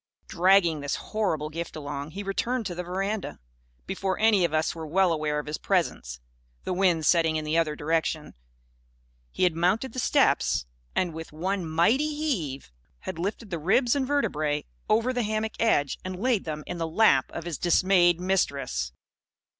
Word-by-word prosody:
Dragging 175 -3 +3
this 145 -1 -2
horrible 175 -9 -2
gift 165 +2 -5
along, 145 -1 -5
he 195 +5 -6
returned 230 +5 -1
to 185 - -3
the 175 - -4
veranda. 195 +4 -3 0.5
Before 190 - -2
any 215 -3 +4
of 170 - +1
us 155 0 +1
were 160 -1 -7
well 180 +2 +3
aware 150 -1 -1
of 150 - -3
his 150 +1 -4
presence 160 - -1 0.4
(the - - -2
wind 180 -4 +2
setting 165 -1 +3
in 155 -1 -2
the 155 +1 -1
other 160 -2 +1
direction) 160 0 -1 1.0
he - - -2
had 180 -2 +4
mounted 195 +9 +1
the 255 - -4
steps 230 - +2 0.3
and, 175 -3 0
with 160 0 -8
one 180 +2 -2
mighty 250 - +2
heave, 175 - -3 0.3
had 160 - -6
lifted 200 +3 -4
the 170 - -2
ribs 235 - +3
and 270 -2 0
vertebræ 155 - 0 0.2
over 230 +4 +2
the 250 - 0
hammock 215 0 -2
edge 145 - +2
and 185 0 -5
laid 235 -2 +1
them 155 -1 -4
in 175 - -5
the 165 - -1
lap 165 -7 +4
of - - -6
his 170 -2 -5
dismayed 175 0 +4
Mistress. 140 - -1
175 Hz, 175 wpm, -26 LUFS, 155-205 Hz, 1.0 s, any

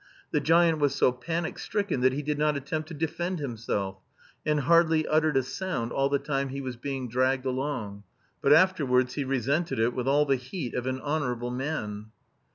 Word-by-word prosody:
The 150 - +2
giant 165 +1 +4
was 145 -2 +2
so - - +4
panic 165 +6 -3
stricken 200 -11 -1
that 130 +1 +5
he 145 +3 -3
did 150 0 -2
not 150 -1 +2
attempt 155 +3 -4
to 165 - -8
defend 175 +4 -2
himself, 110 -8 -3 0.4
and 150 -1 +1
hardly 165 0 +4
uttered 155 -2 +2
a 135 - +3
sound 130 -6 -3
all 135 0 +1
the 140 - +2
time 140 -1 -2
he 135 +1 -5
was 130 -2 -4
being 130 +1 -4
dragged 130 +2 +1
along. 125 -6 -3 0.4
But 140 - +3
afterwards 135 -8 +4
he 145 - -2
resented 135 +3 0
it 115 +2 +2
with 125 0 -3
all 145 +2 +4
the 135 -2 +2
heat 125 +1 -6
of 125 +1 -2
an 130 0 -1
honourable 125 -5 -2
man. 125 -6 -4
140 Hz, 190 wpm, -27 LUFS, 125-155 Hz, 0.4 s, that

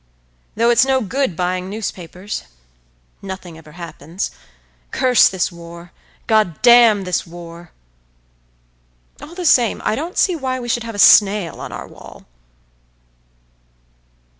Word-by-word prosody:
"Though 235 +2 +3
it's 235 0 +5
no 265 0 +2
good 250 -2 -2
buying 180 +1 -2
newspapers.… 190 - -6 0.8
Nothing 190 -3 -8
ever 155 -1 -15
happens. 170 +1 -6 0.6
Curse 250 -3 +4
this 185 -2 -2
war; 170 0 -12 0.3
God 215 -8 +1
damn 235 -4 +6
this 180 -1 -2
war!… 170 0 -12 1.5
All 335 - -11
the 360 -1 -5
same, 245 -8 +3
I - - +1
don't 325 - -5
see 365 - +2
why 260 -4 -3
we 240 -1 -7
should 240 -1 -1
have 230 -2 -7
a - - -7
snail 200 -3 +5
on - - -7
our - - -8
wall." - - -14
200 Hz, 130 wpm, -18 LUFS, 175-240 Hz, 1.5 s, damn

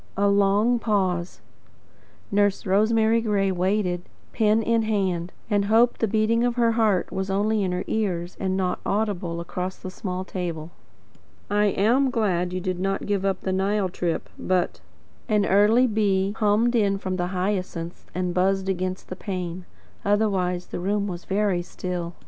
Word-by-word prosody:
A 200 +1 +3
long 200 +4 +3
pause. 185 -6 -1 0.9
Nurse 205 0 +2
Rosemary 220 +3 +3
Gray 200 -3 +1
waited, 185 -1 0 0.3
pen 220 0 +3
in 230 +1 +2
hand, 190 -5 -1 0.2
and 205 -2 +1
hoped 230 +3 +3
the 225 - +3
beating 220 +2 +2
of 245 -1 +1
her 235 -2 +3
heart 220 -5 +1
was 190 0 -3
only 210 +2 +1
in 185 -2 0
her 180 - -1
own - - -2
ears, 180 -5 -2
and 190 0 -1
not 185 -1 -1
audible 195 -5 -1
across 180 +2 -4
the 185 - -7
small 185 -1 -4
table. 170 -4 -5 0.8
"I 210 0 +3
am 230 +7 +3
glad 185 -8 0
you 185 - -2
did 185 -1 -3
not 195 +1 -1
give 200 -2 0
up 195 -1 0
the 190 - -2
Nile 195 +1 +1
trip 175 -1 -2
but 185 -1 0 0.2
" - - -33
An 210 -2 +3
early 210 +6 +5
bee 200 -4 +1
hummed 220 +3 +2
in 200 -3 +2
from 185 -1 -3
the 175 -1 -1
hyacinths 180 -2 -3
and 180 -1 -1
buzzed 190 +1 +1
against 185 0 -2
the 185 - -6
pane. 180 -2 -5 0.4
Otherwise 195 -4 +1
the - - -4
room 200 +3 0
was 180 -3 -6
very 195 -2 +1
still. 175 -1 -5
195 Hz, 165 wpm, -24 LUFS, 180-210 Hz, 0.9 s, early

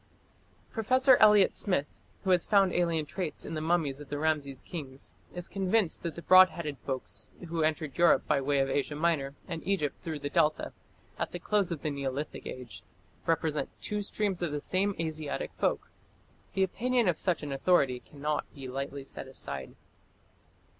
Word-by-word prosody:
Professor 255 +4 +5
Elliot 210 -2 +6
Smith, 180 -8 +1 0.4
who 190 - +1
has 180 -2 +4
found 195 -3 +4
alien 170 -3 +1
traits 175 +1 -4
in - - -5
the 155 - -2
mummies 160 -4 +1
of 145 -2 -10
the 145 - -3
Rameses 145 -4 -1
kings, 140 -6 -7 0.2
is 175 0 -5
convinced 195 -1 +1
that 170 -2 -4
the 170 - -8
broad 185 0 +8
headed 150 -7 -5
folks 130 -1 -4 0.2
who 165 0 -1
entered 155 -2 0
Europe 170 -2 +4
by 140 - +2
way 140 +1 +1
of 135 0 +3
Asia 145 +2 -1
Minor, 150 -3 0
and 165 -3 -4
Egypt 180 -7 -1
through 160 -2 -4
the 145 - -4
Delta, 155 +1 +2 0.5
at - - -2
the - - -2
close 200 0 +1
of 160 -4 -4
the 155 - 0
Neolithic 140 +1 -4
Age, 120 -8 -8 0.5
represent 160 -2 0
"two 210 0 -1
streams 200 -2 -1
of 170 -3 -1
the 150 - -2
same 195 +6 0
Asiatic 155 -3 -3
folk". - - -1 0.6
The 195 - +3
opinion 240 +4 +1
of 175 -3 +1
such 180 -4 +1
an 145 - -4
authority 135 -3 +2
cannot 150 +3 -3
be 135 -2 -7
lightly 135 +1 -5
set 135 - -7
aside. 70 - -6
160 Hz, 175 wpm, -30 LUFS, 140-185 Hz, 0.6 s, broad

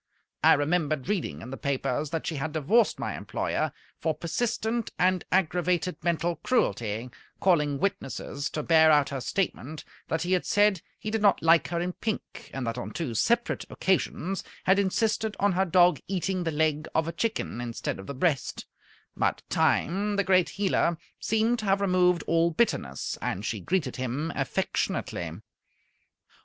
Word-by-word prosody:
I - - +8
remembered 155 -1 0
reading 170 - -2
in 125 - -8
the 135 - -5
papers 140 +1 -1
that 165 +1 -3
she 160 - -2
had 150 +2 -3
divorced 195 - +3
my - - -3
employer - - -2 0.3
for 160 -2 0
persistent 220 +7 -1
and 185 0 +2
aggravated 180 -2 +1
mental 170 0 0
cruelty, 120 - 0 0.3
calling 150 -6 +2
witnesses 150 -7 -2
to 150 - -2
bear 160 0 +6
out 145 -2 +4
her 135 -2 -4
statement 155 -3 -2 0.2
that 160 0 -1
he 175 - -2
had 180 - +2
said 205 -4 +3 0.2
he 215 - -5
did 220 -1 0
not 205 -5 +4
like 165 0 +5
her 170 - -2
in 180 +1 -2
pink, 220 +2 -5
and 135 -2 -4
that 115 +1 -2
on - - -5
two 155 -9 -4
separate 235 - +1
occasions 190 0 -1 0.2
had 190 +2 +4
insisted 215 +2 0
on 205 0 +3
her 190 +1 +2
dog 175 0 +4
eating 185 -1 -1
the 165 - 0
leg 155 0 0
of 160 0 +2
a - - -1
chicken 215 - -2
instead 120 -4 -4
of 95 - -9
the 140 - -5
breast; 140 -1 0 0.5
but - - 0
Time, 200 +5 +1
the 200 - +2
great 185 -2 +3
healer, 190 -4 +1 0.2
seemed 225 +2 +1
to 215 - -4
have 195 0 +3
removed 180 -3 +3
all 165 0 +3
bitterness, 155 - -1
and 100 +4 -2
she 110 -3 -2
greeted 150 - -1
him 130 +6 -2
affectionately. 85 -2 -2
170 Hz, 165 wpm, -27 LUFS, 145-195 Hz, 0.5 s, I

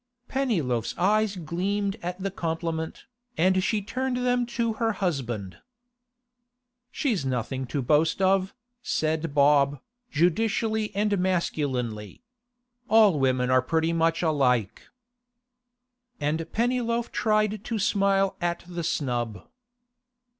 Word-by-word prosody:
Pennyloaf's 165 - -1
eyes 210 +2 +2
gleamed 195 +4 -2
at 180 0 -4
the 195 +1 -3
compliment, 165 -2 -3 0.3
and 185 +2 +3
she 210 0 0
turned 255 +5 -2
them 245 -1 +1
to 235 -2 -1
her 225 -1 +2
husband. 125 - -3 1.3
'She's 245 - -1
nothing 130 0 -2
to 140 +1 -2
boast 155 +7 +2
of,' 190 0 +2 0.3
said 160 - -1
Bob, 140 -1 +4 0.3
judicially 215 +6 +1
and 205 -1 +1
masculinely. 135 - -2 0.7
'All 210 -7 +5
women 130 -1 +1
are 130 0 +5
pretty 160 +4 0
much 165 +1 +1
alike.' 125 - +1 1.3
And 160 +2 -2
Pennyloaf 235 0 0
tried 215 -1 +1
to 230 - -3
smile 195 -2 +2
at 175 0 -1
the 175 -1 -5
snub. 120 -8 -2
175 Hz, 110 wpm, -26 LUFS, 145-210 Hz, 1.3 s, All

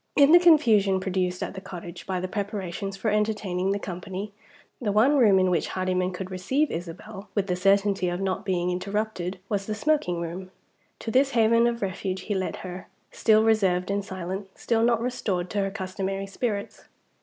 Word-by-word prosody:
In 285 0 +6
the 345 - +9
confusion 225 - +5
produced 185 -1 -1
at - - -5
the 190 - -7
cottage 175 -2 -9
by 185 -1 -1
the 185 - -3
preparations 195 -1 -4
for 215 +2 0
entertaining 210 -3 0
the 200 - +1
company, 190 +2 -6 0.5
the 210 -4 0
one 230 +8 +4
room 215 -8 +5
in 185 -1 +3
which 170 - +1
Hardyman 185 0 -1
could 185 +1 -6
receive 260 +12 0
Isabel 190 +5 -7
with 200 -2 +1
the 180 -2 -1
certainty 195 0 +2
of 175 +1 -3
not 195 +1 -2
being 180 -3 0
interrupted 195 0 -2
was 200 -1 -2
the 215 - -2
smoking 215 - 0
room. 175 +2 -5 0.5
To 225 - -4
this 270 +2 +3
haven 230 +1 +5
of 235 -2 -2
refuge 190 0 -3
he 205 - -3
led 190 -1 -2
her 180 0 -7 0.2
still 220 0 +4
reserved 195 -4 +2
and 200 0 -1
silent, 190 +1 -5
still 230 -1 0
not 230 -1 +3
restored 195 -7 -2
to 205 - -1
her 195 0 0
customary 195 0 -4
spirits. 200 0 -4
195 Hz, 185 wpm, -26 LUFS, 185-215 Hz, 0.5 s, the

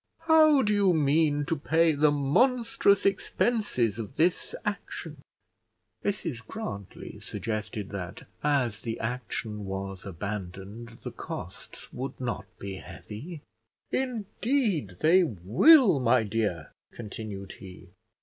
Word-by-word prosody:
How 310 -4 +6
do 210 -1 +2
you 200 -4 +4
mean 145 0 +2
to 165 +2 0
pay 160 +2 +3
the 150 0 +4
monstrous 200 - +3
expenses 195 - +1
of 115 +4 -6
this 175 - +1
action?" - - -5 0.8
Mrs 165 - -2
Grantly 100 - -7
suggested 110 -2 -4
that, 95 -2 -6 0.2
as 125 -8 +1
the 115 -1 -4
action 110 -2 -4
was 95 -1 -5
abandoned, 100 +3 -6
the - - -5
costs - - -8
would 130 +2 -5
not 125 -2 -3
be 95 -1 -6
heavy. 145 - -9 0.5
"Indeed 225 - -1
they 180 +4 +6
will, 155 - +5
my 125 -1 +4
dear," 100 -7 -2 0.2
continued 105 -3 -7
he. 90 -1 -12
130 Hz, 110 wpm, -28 LUFS, -, 0.8 s, How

